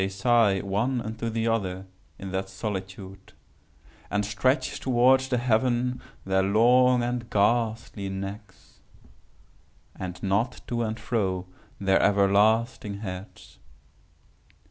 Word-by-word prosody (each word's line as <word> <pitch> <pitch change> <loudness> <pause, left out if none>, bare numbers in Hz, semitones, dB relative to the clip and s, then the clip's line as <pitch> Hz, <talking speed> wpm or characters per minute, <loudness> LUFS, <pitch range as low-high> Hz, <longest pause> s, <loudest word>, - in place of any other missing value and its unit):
They 95 - 0
sigh 105 -1 +2
one 110 +6 -1
unto 110 0 -4
the 115 0 -1
other 95 -4 -1 0.3
in 95 -1 -7
that 95 0 -3
solitude, 95 -1 -7 0.8
and 105 0 0
stretch 110 +7 0
towards 130 +1 +3
the 125 -2 0
heaven 125 +1 +1 0.2
their 95 0 +2
long 120 +5 +4
and 120 -1 -3
ghastly 110 -1 0
necks, 95 +1 -8 1.2
and 90 -1 -6
nod 105 +6 0
to 120 -1 -2
and 110 -1 -3
fro 95 -6 -1 0.3
their 95 -1 +2
everlasting 100 +1 +2
heads. 95 -1 -9
105 Hz, 110 wpm, -26 LUFS, 95-120 Hz, 1.2 s, long